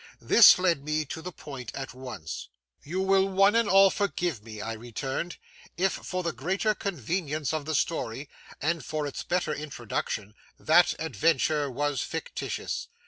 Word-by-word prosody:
This 230 - +8
led 175 -6 +1
me 155 +1 -1
to 160 - -6
the 180 +2 -6
point 135 -7 -8
at 135 -1 -5
once. 125 - -7 0.4
'You 180 +6 -2
will 195 0 +3
one 195 +2 +4
and 230 -2 +2
all 195 0 +7
forgive 175 - -1
me,' 110 -1 -9
I 115 +2 -4
returned, 130 +9 -4 0.4
'if 190 +2 +2
for 185 0 -4
the 170 - 0
greater 190 - 0
convenience 160 - -2
of 155 -2 -2
the 160 0 -1
story, 140 -3 -1 0.3
and 165 +2 -1
for 155 -1 -3
its 140 - -4
better 175 -3 -1
introduction, 120 -7 -4 0.3
that 175 +3 +5
adventure 155 +1 +1
was 145 0 -1
fictitious. - - -4
155 Hz, 155 wpm, -28 LUFS, 135-180 Hz, 0.4 s, This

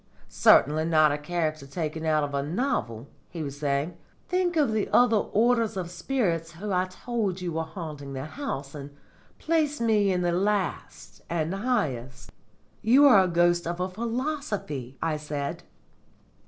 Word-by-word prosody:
"Certainly 155 +3 +4
not 155 -2 +4
a 145 - -1
character 155 -2 -2
taken 160 +1 -4
out 155 -1 +2
of 145 -1 -4
a 140 - 0
novel," 145 - -2 0.2
he 165 -3 -5
was 140 -1 -6
saying. 145 +4 -1 0.3
"Think 360 -1 +1
of 290 -7 +3
the 215 -2 -1
other 240 -2 +5
orders 230 0 +1
of 175 -2 -4
spirits 175 -6 -1
who 200 +5 -5
I 180 0 +2
told 195 0 -3
you 180 -1 -3
were 160 0 -1
haunting 155 -4 -7
the 135 +1 -5
house, 155 - -5
and 140 -1 -9 0.4
place 310 -2 0
me 215 -4 +2
in 180 -1 0
the 175 - +1
last 195 +1 -2
and 165 0 -1
highest." 135 - -2 0.5
"You 260 +6 +6
are 200 -9 +7
the 175 - -5
ghost 175 0 +3
of 170 +1 -3
a 180 - 0
philosophy!" 220 - -4
I 160 -2 0
said. 145 -1 -4
175 Hz, 160 wpm, -26 LUFS, 150-220 Hz, 0.5 s, are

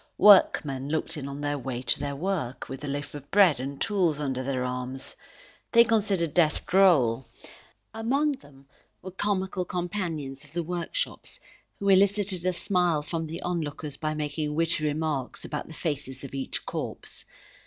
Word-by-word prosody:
Workmen 145 -9 +6
looked 160 +2 -1
in 140 -3 -5
on 140 +1 -6
their 145 0 -1
way 125 -1 -4
to - - +2
their 140 -1 -3
work, 155 -6 -2
with 135 +1 -7
a - - -3
loaf 140 0 -4
of 145 -1 -9
bread 195 -9 +5
and 135 +2 -5
tools 180 -8 +1
under 135 -3 -1
their 130 -1 -1
arms. 125 +1 -5 0.6
They 235 0 +8
considered 200 -8 +1
death 160 -4 +3
droll. 135 -11 +4 0.7
Among 265 +7 +1
them 145 - -11 0.4
were 185 - -6
comical 190 -1 -1
companions 170 -6 -3
of 145 0 -16
the 170 0 -1
workshops 175 - -3 0.4
who 200 - -3
elicited 195 -1 +3
a - - +4
smile 175 -4 +1
from 165 +1 -3
the 165 +2 -6
onlookers 155 -4 -3
by 155 +1 -2
making 150 0 -2
witty 165 -1 +1
remarks 150 -3 -2
about 150 -1 -4
the 160 - -10
faces 145 -5 -3
of 135 - -8
each 135 -1 -3
corpse. - - -5
155 Hz, 165 wpm, -27 LUFS, 140-185 Hz, 0.7 s, They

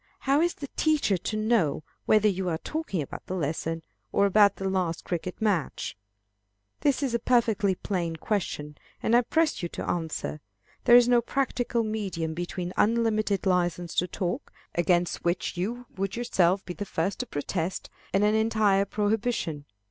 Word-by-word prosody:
How 280 +2 +3
is 345 +1 +1
the 285 - -6
teacher 305 -10 +2
to 200 +4 -3
know 215 -9 +1 0.2
whether 215 0 +5
you 190 -2 0
are 160 - 0
talking 250 - -3
about - - -9
the 185 - -3
lesson, 165 0 -2 0.3
or 200 - +3
about 200 0 +5
the 195 - -3
last 180 -4 -1
cricket 175 +1 -3
match? 200 - -1 0.8
This 285 0 +1
is 260 -4 0
a 235 - +2
perfectly 220 -5 +2
plain 175 -4 -2
question, 155 -6 -3 0.2
and 230 - +3
I 240 - +7
press 320 +6 +1
you 175 - -3
to - - -5
an - - -4
answer. 160 -2 -4 0.4
There 240 - +8
is 245 -1 +7
no 245 -1 +5
practical 245 -2 0
medium 190 -7 -2
between 175 +1 -4
unlimited 215 -3 +2
license 175 -2 +1
to 180 - +3
talk 180 -1 -3 0.2
against 175 0 +1
which 175 +1 -1
you 230 +8 -3
would 195 0 -2
yourself 190 -5 +2
be 180 - -5
the 205 - -5
first 190 0 -2
to 250 - -3
protest 170 +2 -3 0.2
and 195 - +2
an 210 0 +4
entire 215 -3 +3
prohibition. 205 -8 -1
195 Hz, 170 wpm, -27 LUFS, 175-230 Hz, 0.8 s, There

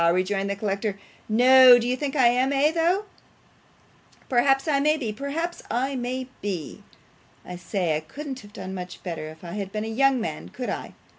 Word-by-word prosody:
rejoined 195 +2 0
the 200 - -1
collector. 200 0 -2 0.3
'No. 250 +2 +8
Do 240 0 -1
you 250 - +1
think 280 +2 -4
I 260 -4 +4
am 250 +2 +3
though, 325 +7 +2
eh? - - -19 1.2
Perhaps 270 +3 +3
I 285 -3 +2
may 305 +2 +2
be, 230 -8 -3
perhaps 305 +8 -4
I 265 +3 -1
may 255 +1 -3
be. 185 -7 -5 0.6
I 180 - -7
say, 175 -2 -1
I - - 0
couldn't 265 - -7
have 205 -3 -14
done 190 -2 -7
much 180 -1 -8
better 165 -4 -5
if 160 +2 -14
I 170 - -7
had 195 0 -5
been 215 +1 -3
a - - -4
young 265 +3 +2
man, 155 -8 -5
could 250 - -5
I? - - -6
240 Hz, 195 wpm, -25 LUFS, 195-270 Hz, 1.2 s, No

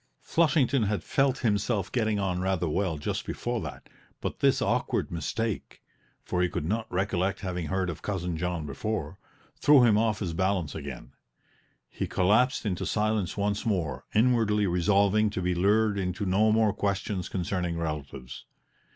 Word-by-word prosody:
Flushington 150 -5 +2
had 105 0 -1
felt 135 -1 +1
himself 105 -2 0
getting 110 -4 +1
on 95 -3 -1
rather 95 -2 0
well 85 +1 0
just 75 - -3
before - - -3
that, - - -8 0.3
but - - -4
this - - +3
awkward - - 0
mistake 100 +7 -3 0.4
for 90 - -1
he 90 - +2
could 75 - -3
not 110 +5 -2
recollect 95 0 0
having 90 -4 -3
heard 95 +3 -1
of 85 -2 -5
Cousin 90 -4 -2
John 85 -1 -2
before 95 +7 -4 0.4
threw 145 -3 +6
him 110 -3 +5
off 110 -1 +1
his 90 -6 -3
balance 95 -3 0
again; 70 -4 -7 0.8
he - - -4
collapsed 110 +8 +2
into 95 -4 -1
silence 105 -4 0
once 100 +1 0
more, 85 - -1
inwardly 110 -3 +3
resolving 100 +4 +3
to 100 - -4
be 90 0 +1
lured 100 +3 +2
into 90 +1 -2
no 105 +4 +3
more 110 -2 +3
questions 100 -1 -2
concerning 90 -2 -2
relatives. 70 -5 -5
95 Hz, 155 wpm, -28 LUFS, 90-110 Hz, 0.8 s, threw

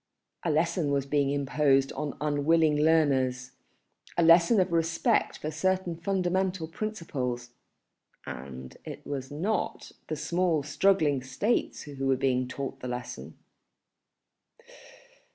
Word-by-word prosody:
A 170 - 0
lesson 165 0 +1
was 140 -1 0
being 140 0 +1
imposed 140 -1 +2
on 145 0 -4
unwilling 150 +1 +2
learners, 140 -5 +2 0.7
a 170 - +4
lesson 170 +6 +6
of 185 -1 +1
respect 165 -1 +1
for 155 - -4
certain 185 +2 0
fundamental 185 0 -1
principles, 140 - -4 0.7
and 65 0 -8
it - - -9
was 135 -2 -4
not 185 +8 -2 0.2
the 155 - -2
small 165 0 0
struggling 155 -4 +2
States 135 - -1
who 140 -2 -4
were 135 - +4
being 130 -1 +1
taught 130 +1 -5
the 125 - -6
lesson. 125 0 -6
150 Hz, 115 wpm, -28 LUFS, 135-170 Hz, 0.7 s, lesson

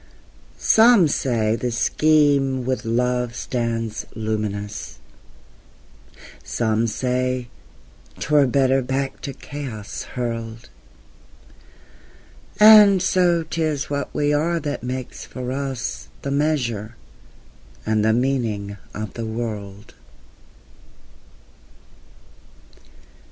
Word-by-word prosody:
Some 220 -6 +6
say 115 -6 0
the 125 +1 -2
Scheme 140 0 +2
with 130 -2 -2
love 125 +1 0
stands 115 -3 -3
luminous, 105 -2 -4 1.5
Some 115 0 0
say 125 +1 -1 0.7
't 145 - -6
were 145 -2 +5
better 135 +1 +2
back 135 +1 -3
to 140 - -5
chaos 130 -6 -7 0.2
hurled; 115 -1 -4 1.9
And 210 -2 +9
so 175 -2 +2
't 160 +1 -4
is 150 -2 -1
what 140 0 -2
we 145 0 0
are 165 +3 +1
that 145 -2 -4
makes 130 +1 -5
for 125 -1 -6
us 130 - -4
The 140 - -3
measure 125 -7 -1 0.9
and 110 -1 +1
the 110 - +3
meaning 115 -5 -1 0.2
of 110 0 -5
the 115 -1 -5
world. 105 -2 -6
125 Hz, 95 wpm, -22 LUFS, 115-145 Hz, 1.9 s, And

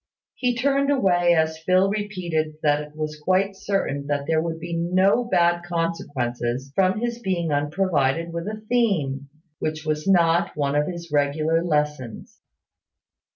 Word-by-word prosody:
He 250 -1 0
turned 275 +3 +1
away 175 -10 +3
as 160 0 +1
Phil 185 +3 +3
repeated 180 -7 -2
that 145 -1 +3
it 150 0 -11
was 155 -1 -4
quite 190 +5 +1
certain 145 -9 -2
that 145 -1 -1
there 160 +1 +1
would 165 0 -4
be 170 0 -5
no 185 +7 +2
bad 175 -6 +2
consequences 135 -7 -3
from 190 +3 +2
his 240 0 -2
being 180 -7 -1
unprovided 155 +1 0
with 170 +2 -4
a 215 0 -5
theme, 155 - 0 0.3
which 155 0 -3
was 155 +2 -2
not 170 -3 +3
one 140 -1 0
of 150 0 +2
his 170 -3 -7
regular 155 +3 +1
lessons. 150 -7 -2
165 Hz, 150 wpm, -23 LUFS, 150-185 Hz, 0.3 s, away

